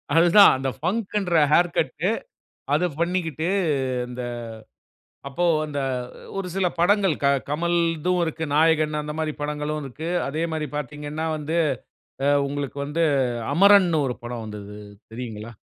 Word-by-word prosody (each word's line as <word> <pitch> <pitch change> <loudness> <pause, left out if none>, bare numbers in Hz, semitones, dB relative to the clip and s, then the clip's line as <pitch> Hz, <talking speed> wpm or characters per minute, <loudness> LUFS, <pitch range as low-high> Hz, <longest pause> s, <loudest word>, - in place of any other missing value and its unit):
அதுதான், 175 +5 +7
அந்த 135 0 -2
ஃபங்குன்ற 190 -1 -1
hair 175 +2 +5
cut - - 0 0.7
அத 180 +4 +2
பண்ணிக்கிட்டு, 170 -2 -1 0.6
இந்த 125 0 -6 1.1
அப்போ 175 +6 -1 0.2
இந்த 145 -1 -3 0.6
ஒரு 190 -2 -3
சில 190 -2 +2
படங்கள் 195 -2 +3
க - - +4 0.2
கமல்தும் 170 +2 0
இருக்கு. 160 0 -3
நாயகன் 155 -1 +3
அந்த 150 0 -5
மாரி 155 -1 -1
படங்களும் 150 +1 -3
இருக்கு. 155 +5 -6 0.2
அதே 155 +4 -2
மாரி 155 -1 -2
பாத்தீங்கன்னா 150 +2 -4
வந்து 155 +3 -2 0.9
உங்களுக்கு 140 -1 -4
வந்து 155 +4 -2 0.5
அமரன்னு 190 -4 +6
ஒரு 125 - -1
படம் 120 -1 -5
வந்தது 105 -1 -8 0.4
தெரியுங்களா? 115 -2 -6
155 Hz, 125 wpm, -24 LUFS, 145-175 Hz, 1.1 s, அதுதான்